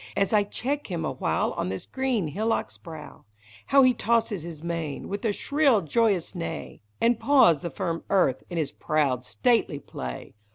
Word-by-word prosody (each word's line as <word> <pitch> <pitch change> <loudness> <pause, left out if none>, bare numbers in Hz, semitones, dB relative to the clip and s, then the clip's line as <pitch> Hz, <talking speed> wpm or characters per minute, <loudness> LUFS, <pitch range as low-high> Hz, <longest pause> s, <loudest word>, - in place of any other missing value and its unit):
As 195 +2 +1
I 210 - +6
check 280 +8 -3
him 170 -4 -3
a - - -1
while - - 0
on - - -3
this 95 0 -5
green 255 - -1
hillock's 220 +9 -1
brow; 160 -4 -11 0.4
How 275 0 +6
he 255 -1 +5
tosses 225 -5 +1
his 165 -1 -8
mane, 165 -4 -4
with 200 +1 -4
a 220 - +3
shrill 280 0 +2
joyous 195 +1 +1
neigh, 170 -3 -6 0.2
And 235 0 +3
paws 260 - +5
the 170 - -4
firm 170 -2 -3
earth 140 -10 +2
in 175 - -4
his 150 -3 -1
proud, 135 -5 0
stately 225 - +1
play! 65 - -7
185 Hz, 175 wpm, -26 LUFS, 155-230 Hz, 0.4 s, I